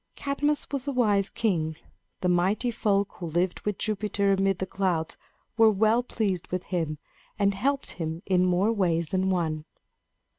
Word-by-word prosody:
Cadmus 290 +1 0
was 280 -1 -3
a - - +1
wise 210 -6 +2
king. 165 -8 0 0.5
The 180 - +1
Mighty 190 +7 +2
Folk 205 -3 +1
who 175 - -4
lived 175 +3 0
with 210 -2 -3
Jupiter 205 -1 0
amid 195 -1 +1
the 190 - -2
clouds 185 -4 -1 0.4
were 225 -1 +7
well 220 +3 +3
pleased 205 -7 -2
with 180 0 -3
him 165 -6 -2 0.4
and 200 0 +2
helped 275 +8 -1
him 165 +1 -5
in 185 -2 +3
more 185 +4 +2
ways 170 -6 +1
than 190 0 +1
one. 160 -4 -1
195 Hz, 160 wpm, -27 LUFS, 175-215 Hz, 0.5 s, were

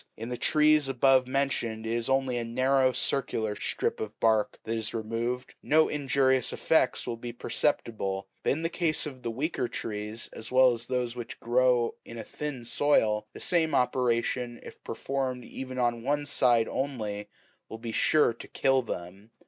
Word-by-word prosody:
In 115 +2 -6
the 125 - -2
trees 150 +1 +3
above 135 0 +4
mentioned, 130 -5 -1
if 110 - -2
it - - +1
is 120 +2 -2
only 135 -1 +1
a 120 - -1
narrow 130 +3 +2
circular 115 -4 -1
strip 105 - -2
of 110 -1 -6
bark 110 -2 +2
that 115 - -2
is 110 0 -3
removed, 115 +3 -3
no 155 +1 +4
injurious 135 -3 +1
effects - - +1
will 115 - -3
be 120 +1 -6
perceptible; 105 -6 -2
but - - 0
in 160 +4 -4
the 165 - +1
case 165 -3 0
of 135 -4 -7
the 120 - -3
weaker 130 +2 -2
trees, 105 0 -4
as 110 - -8
well 130 -1 +6
as 115 0 -5
those 125 -2 -1
which 120 -2 -7
grow 120 0 +2
in 115 - -10
a 115 - -5
thin 145 -5 -6
soil, 110 -6 +2
the - - -9
same 165 -3 +2
operation, 125 -1 0
if - - -12
performed 130 -2 -3
even 130 -1 -7
on 120 -2 +1
one 145 +4 0
side 120 -5 +3
only, 110 -7 -3 0.4
will 110 - -6
be 115 0 -6
sure 150 +2 +3
to 115 - -11
kill 135 -1 +2
them. 100 -1 -7
125 Hz, 180 wpm, -28 LUFS, 115-135 Hz, 0.4 s, well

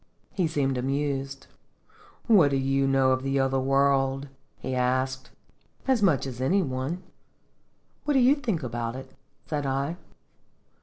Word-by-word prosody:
He 180 -4 0
seemed 135 -4 0
amused. 135 +1 -2 0.8
"What 195 - +6
do 140 - +1
you 135 0 +1
know 135 -1 +3
of 130 0 +1
the 135 +1 0
other 135 0 +1
world?" 135 0 +1 0.3
he 130 - -5
asked. 130 +1 0 0.6
"As 260 -4 +3
much 165 - +3
as 130 -2 -6
any 185 +9 +2
one. 135 +6 -3 1.0
What 295 - +1
do - - +5
you 255 +2 +6
think 230 - -2
about 120 -1 -3
it?" 130 0 -9 0.3
said 145 -3 -2
I. 140 +5 -1
135 Hz, 145 wpm, -26 LUFS, 130-150 Hz, 1.0 s, What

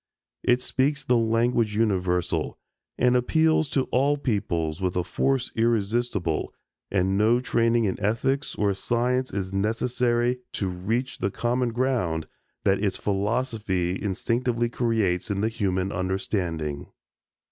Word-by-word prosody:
It 125 +1 +2
speaks 140 +2 0
the 125 - +2
language 115 -1 +2
universal, 95 -5 0 0.4
and 125 0 +3
appeals 160 +4 +3
to 135 - +1
all 140 +3 +3
peoples 85 - -1
with 90 -1 -1
a 90 - +1
force 135 +7 0
irresistible 110 -6 0 0.4
and 95 0 +1
no 115 +3 +4
training 115 -2 +2
in 95 - -1
ethics 125 +7 0
or 100 -1 +1
science 125 +5 0
is 95 -1 -3
necessary 120 +4 +1
to 100 - -2
reach 115 +8 -2
the 95 - 0
common 120 +4 0
ground 115 -11 0 0.4
that 100 +1 +2
its 100 - 0
philosophy 105 -3 -1
instinctively 115 +4 0
creates 110 -8 0
in 100 -1 -1
the 110 - +1
human 95 -4 -1
understanding. 90 -5 -2
115 Hz, 125 wpm, -25 LUFS, 95-125 Hz, 0.4 s, no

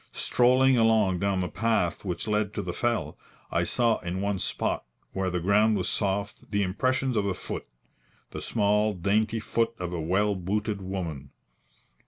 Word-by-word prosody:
Strolling 130 +1 +3
along 110 -5 +3
down 100 -1 +1
the 90 - -1
path 95 -2 0
which 95 +3 -3
led 105 -1 0
to - - -2
the - - -4
fell, - - -1 0.3
I - - +1
saw 115 -2 +2
in 90 +1 -4
one 100 -1 -1
spot - - -1 0.3
where 95 -1 -1
the 90 0 -1
ground 105 +4 +3
was 95 - -1
soft 100 0 -2
the 100 -1 +1
impressions 130 +7 0
of 100 -2 +1
a 95 - -1
foot - - -6 0.6
the - - -6
small, 105 -1 +1
dainty 105 +5 +1
foot 115 +1 0
of 90 -1 -4
a 85 - -2
well 100 +6 +1
booted 100 +3 -2
woman. 90 -7 -5
100 Hz, 170 wpm, -27 LUFS, 95-110 Hz, 0.6 s, Strolling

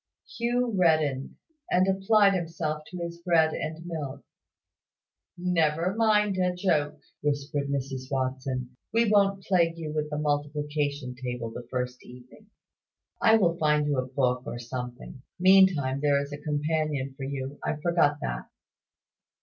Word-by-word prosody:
Hugh 240 0 0
reddened, 155 -7 +2 0.3
and 185 +1 +3
applied 195 +1 +4
himself 165 -3 -2
to 180 - -8
his 170 -1 -5
bread 165 -2 +3
and 160 +2 -5
milk. 155 -6 -5 1.1
"Never 175 0 +1
mind 210 -3 +3
a 180 -1 +1
joke," 150 -5 0 0.2
whispered 145 -1 -1
Mrs 135 -1 -3
Watson. 130 -1 -2 0.2
"We 230 +1 +3
won't 200 -2 +3
plague 170 -3 +2
you 155 -2 -5
with 150 -1 -2
the 150 - -3
multiplication 145 -2 -1
table 125 -2 -5
the 120 +1 -8
first 125 0 -3
evening. 125 - -15 0.7
I 225 0 +6
will 175 -5 +2
find 150 -1 +3
you 145 -3 +1
a 130 - -2
book 125 -1 0
or - - -4
something. 125 +1 -7 0.2
Meantime, 180 -8 +5
there 145 -1 +3
is 140 +1 -5
a 145 - -6
companion 150 -2 -1
for 135 - -12
you 135 +1 -5
I - - -1
forgot 150 -2 +2
that." - - -4
150 Hz, 140 wpm, -27 LUFS, 135-175 Hz, 1.1 s, I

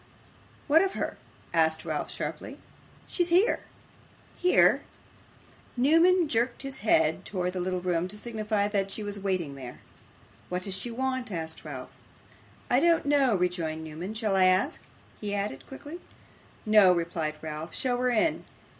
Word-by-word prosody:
'What 315 +3 +5
of 390 0 0
her?' - - -4 0.3
asked 160 0 +2
Ralph 155 -2 -2
sharply. - - -5 0.5
'She's 350 -1 0
here.' 365 +6 +3 0.7
'Here!' 360 - +4 1.0
Newman 330 +6 +5
jerked 240 0 0
his 270 0 -6
head 160 -7 +2
towards 180 -2 -2
his 180 - -1
little 185 0 -2
room, 175 -1 0
to 205 +3 -7
signify 215 -2 -1
that 200 -2 0
she 210 +2 -5
was 205 -1 -4
waiting 185 -7 -1
there. 130 -3 -9 0.7
'What 180 0 -2
does 195 - -4
she 240 - -3
want?' 260 0 -2
asked 160 -3 -5
Ralph. - - -7 0.8
'I - - +5
don't 335 -2 +3
know,' 280 -5 +3
rejoined 175 -3 -1
Newman. 165 +7 -6
'Shall 215 -3 0
I 190 -1 +5
ask?' 185 - +2 0.4
he 205 -1 -3
added 200 -9 -4
quickly. 290 +5 -9 0.7
'No,' 210 -3 +7
replied 165 -3 -2
Ralph. 155 +1 -6
'Show 250 -2 0
her 250 0 +1
in! 245 +7 +1
200 Hz, 150 wpm, -28 LUFS, 175-260 Hz, 1.0 s, No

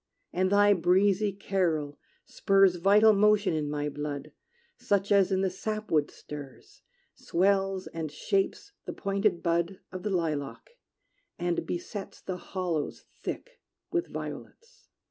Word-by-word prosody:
And 185 +1 +1
thy 205 0 +6
breezy 195 +3 +3
carol 170 -7 -1 0.3
spurs 195 -2 +3
Vital 205 +5 +6
motion 210 -1 +3
in 150 -2 -1
my 145 0 -2
blood, 145 0 -5 0.4
Such 200 0 0
as 195 -1 +4
in 190 0 +2
the 190 - +2
sapwood 215 -6 -1
stirs, 145 -3 -11 0.3
Swells 195 +1 +1
and 160 -2 -5
shapes 195 - -1
the - - -5
pointed 200 -2 0
bud 170 +2 0
Of 185 0 -6
the 210 - -2
lilac; 160 - -2 0.7
and 175 -1 -1
besets 195 +3 -5
The 185 -1 -5
hollows 175 -5 -3 0.2
thick - - -6 0.3
with 350 0 0
violets. 480 +1 -9
190 Hz, 125 wpm, -28 LUFS, 165-200 Hz, 0.7 s, thy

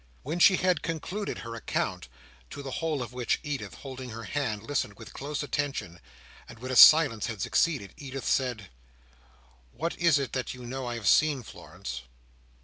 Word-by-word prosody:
When 160 +6 -3
she 190 +2 +7
had 180 -3 +2
concluded 175 +5 -3
her 115 0 -7
account, 115 - -2 0.4
to 140 - -8
the 135 - -6
whole 155 -2 -1
of 120 0 -9
which 125 -1 0
Edith, 145 -3 -4
holding 130 -2 -8
her 115 0 -7
hand, 110 -4 -2
listened 115 -5 -2
with - - -11
close 145 +1 -4
attention, 140 - -3 0.5
and - - -11
when 130 +3 -6
a - - -1
silence 140 -8 +8
had 115 -4 -5
succeeded, 130 - +1
Edith 135 -1 -6
said: 120 -7 0 1.0
"What 165 +6 -3
is 170 -4 +5
it 135 -5 -3
that 130 0 -3
you 125 -1 -10
know 130 +1 -4
I 120 - -3
have 115 -4 -4
seen, 145 +3 +4
Florence?" 65 - -8
130 Hz, 175 wpm, -28 LUFS, 115-150 Hz, 1.0 s, silence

